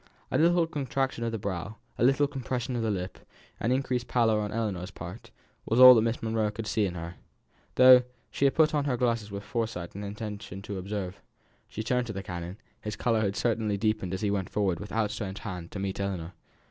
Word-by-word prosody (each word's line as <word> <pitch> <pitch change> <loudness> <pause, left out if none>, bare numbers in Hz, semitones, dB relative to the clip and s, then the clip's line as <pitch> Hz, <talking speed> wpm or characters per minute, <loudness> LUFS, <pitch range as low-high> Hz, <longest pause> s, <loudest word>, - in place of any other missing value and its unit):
A - - +2
little 170 +1 +4
contraction 135 -5 -2
of 115 - -1
the 115 - -2
brow, 100 0 -4 0.2
a - - +2
little 135 +3 +4
compression 130 -3 -3
of 120 - -1
the 110 - 0
lips, 95 -2 -3 0.4
an 115 - 0
increased 130 -2 0
pallor 115 -3 +3
on 105 -1 -2
Ellinor's 100 -5 -2
part, 90 -2 -9 0.4
was 115 - +2
all 130 0 +12
that 115 - +4
Miss 115 +1 -1
Monro 110 -1 +1
could 110 +1 -6
see 105 -1 +1
in 90 - -6
her, 85 +1 -7 0.6
though 130 0 +9 0.3
she 140 - +1
had 135 - +3
put 155 -1 +4
on 145 -2 +1
her 130 -4 0
glasses 115 -4 0
with 100 0 -6
foresight 115 -8 -3
and 100 - -6
intention 105 -2 -6
to 100 -2 -5
observe. 95 -1 -5 0.5
She 110 - -5
turned 125 +1 0
to 110 - -4
the 100 0 -5
canon; 90 +1 -6 0.2
his 105 -1 -4
colour 115 -2 +1
had 100 -2 0
certainly 110 -3 0
deepened 110 -3 0
as 95 - -5
he 105 -2 +1
went 95 -2 -1
forwards 95 -4 0
with 105 - -8
out 110 -2 0
stretched 95 -2 -5
hand 90 -5 -6
to - - -7
meet 95 0 -3
Ellinor. 90 -3 -3
110 Hz, 220 wpm, -28 LUFS, 100-120 Hz, 0.6 s, all